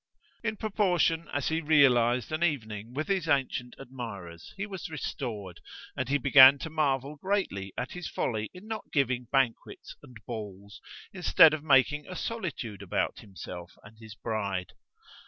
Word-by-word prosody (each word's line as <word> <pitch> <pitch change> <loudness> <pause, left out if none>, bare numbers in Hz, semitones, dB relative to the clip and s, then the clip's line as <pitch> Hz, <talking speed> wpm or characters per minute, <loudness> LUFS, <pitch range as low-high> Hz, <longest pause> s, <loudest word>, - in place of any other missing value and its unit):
In 225 -2 -2
proportion 180 -6 +1
as 145 -2 -1
he 160 +1 0
realized 125 -6 +4
an 155 +2 -1
evening 110 -8 -2
with 155 +2 -2
his 190 -4 0
ancient 130 -3 0
admirers 100 -11 -8
he 195 - -3
was 190 -8 -7
restored, 110 - -5 0.3
and 130 -1 -3
he 145 - +3
began 135 0 +8
to 160 +3 -7
marvel 145 -2 0
greatly 145 - -2
at 125 - -3
his 180 -2 -6
folly 110 -2 -2
in 180 +3 -13
not 220 -1 -5
giving 125 -4 0
banquets 135 -4 -1
and 125 - -14
Balls, 105 -2 -8 0.3
instead 175 -4 +6
of 155 -1 -3
making 145 0 +3
a 185 - -7
solitude 155 - -4
about 100 - -2
himself 90 -3 -9
and 110 +2 -16
his 110 -2 -11
bride. 100 -6 -3
135 Hz, 155 wpm, -29 LUFS, 110-160 Hz, 0.3 s, began